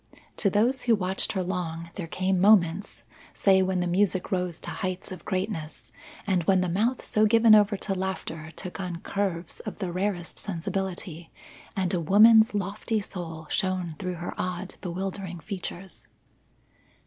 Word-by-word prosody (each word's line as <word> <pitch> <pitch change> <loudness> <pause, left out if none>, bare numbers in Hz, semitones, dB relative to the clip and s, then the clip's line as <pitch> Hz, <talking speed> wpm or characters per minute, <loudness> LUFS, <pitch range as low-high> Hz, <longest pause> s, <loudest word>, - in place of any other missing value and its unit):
To 200 - +2
those 235 +7 +2
who 235 -2 +3
watched 190 -1 0
her 190 -2 -1
long, 170 -2 -4
there 180 -5 -5
came 185 +2 0
moments 195 -2 +3 0.3
say 190 -1 +4
when 185 -1 +1
the - - 0
music 185 +1 +1
rose 180 -3 -1
to - - -6
heights 185 +1 -4
of 185 - -8
greatness 185 -5 -3 0.5
when 190 0 +4
the 185 - 0
mouth 225 +8 0
so 215 0 +3
given 225 0 +6
over 205 -1 +5
to 195 - -2
laughter 185 -4 -4
took 180 - -7
on 180 -2 -4
curves 185 -4 -3
of - - -7
the 185 -3 -3
rarest 180 -1 -2
sensibility, 175 -2 -4 0.4
and 185 -2 -1
a 175 - +1
woman's 220 +6 +6
lofty 205 +3 -1
soul 170 -5 -6
shone 185 -3 0
through 180 -2 -3
her 175 +1 -5
odd, 185 +1 -3
bewildering 185 0 -4
features. 185 +2 -7
185 Hz, 155 wpm, -27 LUFS, 175-200 Hz, 0.5 s, given